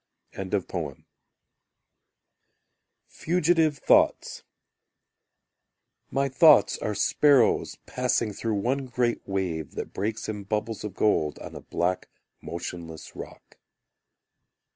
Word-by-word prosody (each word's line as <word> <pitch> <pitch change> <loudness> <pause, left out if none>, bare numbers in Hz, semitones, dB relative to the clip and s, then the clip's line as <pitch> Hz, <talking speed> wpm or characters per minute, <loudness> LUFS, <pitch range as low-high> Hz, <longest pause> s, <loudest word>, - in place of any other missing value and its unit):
Fugitive 165 -3 +1
Thoughts - - +2 1.7
My 140 0 0
thoughts 150 +1 +5
are 105 - -3
sparrows 140 +1 +3
passing 125 -4 -1
Through 110 +1 -2
one 130 +6 -1
great 120 -1 0
wave 90 -6 -3
that - - -6
breaks 110 +3 -3
In 105 -2 -5
bubbles 105 +1 -3
of 105 -3 -6
gold 80 -9 +1
on - - -9
a - - -8
black 90 +2 -2 0.3
motionless 85 -1 -7
rock. - - -11
110 Hz, 90 wpm, -26 LUFS, 95-135 Hz, 1.7 s, thoughts